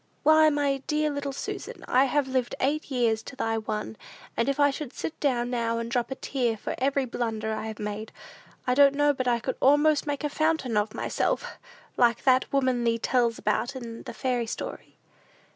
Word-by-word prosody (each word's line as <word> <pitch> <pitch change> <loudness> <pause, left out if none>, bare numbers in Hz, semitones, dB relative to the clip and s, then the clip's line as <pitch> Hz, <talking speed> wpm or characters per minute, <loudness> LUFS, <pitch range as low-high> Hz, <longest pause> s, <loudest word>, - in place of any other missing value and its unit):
Why, 315 +1 +6
my 285 -2 0
dear 300 0 +1
little 285 -1 -3
Susan, 270 - -6
I 260 +2 +4
have 275 +1 +1
lived 255 -2 -1
eight 290 +3 0
years 235 -4 +1
to 275 - -10
thy 225 -3 -1
one, 215 0 -4 0.4
and 235 - +1
if 275 - -1
I 285 -1 +5
should 275 -2 -6
sit 320 - -5
down 245 -4 0
now 230 -1 0
and 230 0 -4
drop 240 -1 0
a 265 - -3
tear 245 -5 -1
for - - -4
every 275 +1 +1
blunder 220 -3 -2
I 220 0 -4
have 220 -1 -6
made, 210 +1 -5 0.5
I 250 - +2
don't 280 +1 +6
know 290 0 +3
but 255 -2 -3
I 240 -1 +3
could 260 +3 -3
almost 295 +2 +4
make 290 0 -2
a 295 - 0
fountain 310 -6 0
of 210 +1 0
myself, - - -2 0.4
like 235 -1 +3
that 260 -1 +3
woman 255 -3 +1
thee 230 -1 +2
tells 235 0 +1
about 220 +5 -1
in 235 -3 -7
the - - -8
fairy 245 -3 -1
story." - - -6
255 Hz, 200 wpm, -27 LUFS, 230-280 Hz, 0.5 s, Why